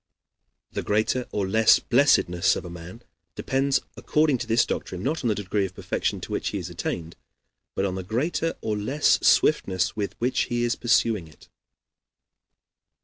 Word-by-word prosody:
The - - -3
greater 110 +4 0
or 100 -2 -1
less 110 +3 +5
blessedness 95 -9 +3
of - - -6
a 90 - -8
man 90 +7 -10 0.3
depends, 135 +1 +1 0.2
according 150 -4 +1
to 120 - -5
this 115 +1 +3
doctrine, 90 0 -4
not 155 +4 -2
on - - +1
the 110 - +1
degree 100 0 -1
of 95 - -16
perfection - - -2
to - - -8
which - - -2
he - - -2
has - - -6
attained, 85 -1 -4 0.6
but 95 - 0
on 95 - -1
the 95 - -4
greater 145 - -1
or 110 - -2
less 130 +9 +2
swiftness 95 -1 +2
with 105 -2 -3
which 125 +2 +1
he 120 0 -1
is 120 0 +1
pursuing 115 -6 +1
it. 75 - -19
110 Hz, 170 wpm, -25 LUFS, 95-125 Hz, 0.6 s, less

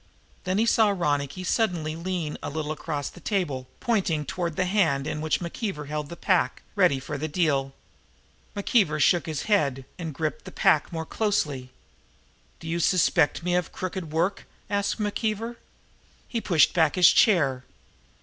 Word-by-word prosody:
Then 185 +1 0
he 220 - +3
saw 220 -2 +4
Ronicky 150 -4 -1
Doone - - -6
suddenly 175 -7 0
lean 170 -2 -3
a - - -4
little 155 0 -3
across 150 -2 -3
the - - -14
table, 160 - -2
pointing 185 -10 0
toward 170 -2 -3
the 185 - +1
hand 175 -8 +1
in 155 0 -3
which 155 -1 0
McKeever 170 - -4
held 150 -1 -3
the 170 - -7
pack, 185 0 +1
ready 180 -9 +3
for 145 +2 -5
the 155 - -2
deal. 145 -5 0 0.8
McKeever 200 -6 +2
shook 170 +4 +3
his 155 -2 -3
head 140 -11 +1
and 165 -2 -4
gripped 155 +2 -3
the - - -8
pack 155 - +2
more 160 -1 -4
closely. 150 - -1 0.9
"Do 165 - -9
you 165 +1 -1
suspect 170 -2 +2
me 175 0 0
of 180 -1 0
crooked 185 -3 -5
work?" 175 +5 -1 0.2
asked 200 +2 0
McKeever. 220 +2 -2 0.7
He 230 - -3
pushed 165 -9 +4
back 160 -4 +3
his 180 -2 +7
chair. 140 - +3
170 Hz, 165 wpm, -26 LUFS, 150-190 Hz, 0.9 s, his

